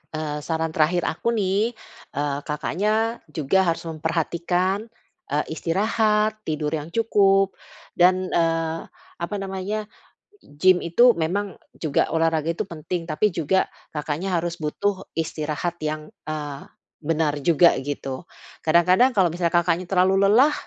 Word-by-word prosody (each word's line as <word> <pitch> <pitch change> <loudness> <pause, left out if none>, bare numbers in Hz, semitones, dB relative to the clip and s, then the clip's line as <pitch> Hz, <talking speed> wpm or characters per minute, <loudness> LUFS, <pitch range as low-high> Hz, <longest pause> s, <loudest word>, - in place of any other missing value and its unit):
Eee, 150 -1 -3
saran 160 +1 -2
terakhir 160 +3 +2
aku 235 +8 -1
nih, 210 +3 0 0.4
eee, 145 0 -1
Kakaknya 215 +9 0
juga 160 +5 +1
harus 165 - 0
memperhatikan, 170 +5 -1 0.4
eee, 145 +2 0
istirahat, 210 +5 +1
tidur 155 -1 -1
yang 155 -1 -3
cukup 195 -4 +3 0.4
dan, 185 +1 +3
eee, 165 -1 0 0.3
apa 170 +4 -3
namanya, 195 +2 -3 0.6
gym 180 +5 +2
itu 240 +9 +5
memang 190 +5 -2 0.2
juga 155 -4 0
olahraga 165 -1 +1
itu 210 +6 -3
penting, 170 +1 -5
tapi 210 +4 +1
juga 170 +4 +1 0.3
Kakaknya 160 +5 -2
harus 170 0 -2
butuh 190 +6 -2
istirahat 160 +1 -3
yang, 155 0 -4 0.2
eee, 145 -2 -5 0.3
benar 150 -2 0
juga 170 +3 +5
gitu. 135 +1 -5 0.3
Kadang-kadang 180 +9 +4
kalau 180 -4 +4
misalnya 170 -1 -1
Kakaknya 175 +1 +1
terlalu 190 +1 +3
lelah, 260 +8 +5
170 Hz, 125 wpm, -23 LUFS, 155-195 Hz, 0.6 s, itu